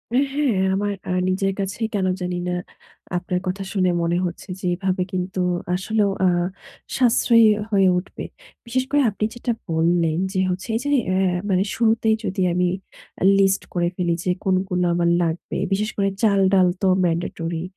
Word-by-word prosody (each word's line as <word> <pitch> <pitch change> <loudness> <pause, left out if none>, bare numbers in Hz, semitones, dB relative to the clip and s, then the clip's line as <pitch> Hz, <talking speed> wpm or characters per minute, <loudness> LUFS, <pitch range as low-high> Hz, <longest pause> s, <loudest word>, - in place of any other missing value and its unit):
এ - - +4 0.2
হ্যাঁ 290 -2 +1 0.2
আমার 205 +1 -1
আ - - -4 0.2
নিজের 195 +1 0
কাছেই 195 +3 -2
কেন 195 -2 0 0.2
জানি 180 0 -2
না 180 - -1 0.6
আপনার 180 0 -2
কথা 190 +2 -2
শুনে 185 -3 +2
মনে 170 +1 +1
হচ্ছে 175 +3 -6
যে 190 - -7
এভাবে 185 0 -1
কিন্তু 185 +1 -3 0.4
আসলেও 205 +2 0 0.2
আ - - +5 0.7
সাশ্রয়ী 235 -2 +5 0.3
হয়ে 195 -2 +4
উঠবে। 180 - -6 0.4
বিশেষ 255 +2 0
করে 290 0 +4
আপনি 210 +1 -2
যেটা 240 0 -2 0.2
বললেন 165 0 +1 0.2
যে 185 - 0
হচ্ছে 185 +1 -3
এই - - +1
যে 285 - -2 0.2
অ্যা 185 0 +1 0.3
মানে 190 -1 +3
শুরুতেই 225 -1 +2
যদি 190 0 -2
আমি 180 0 +2 0.5
অ্যা - - -1
লিস্ট 195 0 +3
করে 175 -1 +1
ফেলি 175 -2 0
যে 180 - +2
কোনগুলো 185 -1 +1
আমার 170 0 +2
লাগবে। 165 0 -3
বিশেষ 210 +2 0
করে 195 -1 +2
চাল, 205 -3 +3
ডাল 185 -2 +5
তো 195 - +2 0.2
mandatory, 165 -1 -2
190 Hz, 170 wpm, -22 LUFS, 180-205 Hz, 0.7 s, আ